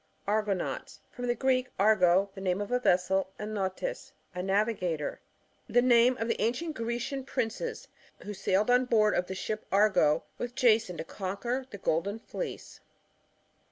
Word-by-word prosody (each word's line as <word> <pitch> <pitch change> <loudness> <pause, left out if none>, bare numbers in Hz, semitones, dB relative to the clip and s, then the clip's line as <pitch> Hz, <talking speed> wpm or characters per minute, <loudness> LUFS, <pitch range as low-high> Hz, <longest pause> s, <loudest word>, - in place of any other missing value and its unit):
Argonauts. 205 -3 -1
— - - -39
From 245 0 -5
the 240 - +1
Greek, 255 +1 +1
argo^ 195 -2 +4
the 195 - -9
name 185 0 0
of 205 +3 -4
a 250 - +2
vessel, 190 -2 +2
and 215 +1 -5
nautes^ 200 - -3 0.2
a 180 - -3
navigator. 190 -5 -1 0.5
The 245 - +4
name 245 0 +5
of 225 - -2
the 230 - -1
ancient 250 +9 -1
Grecian 240 +3 -3
princes 260 - -3 0.4
who 210 - -5
sailed 200 +3 +1
on 250 +1 +4
board 215 -3 +3
of 180 - 0
the 190 - -5
ship 215 +3 -4
Argo 195 -7 +4 0.2
with 245 0 -4
Jason, 220 -7 +3
to 160 - -4
conquer 225 +9 -3
the 200 - -8
golden 195 +3 -1
fleece. 370 - -7
215 Hz, 160 wpm, -29 LUFS, 190-245 Hz, 0.5 s, name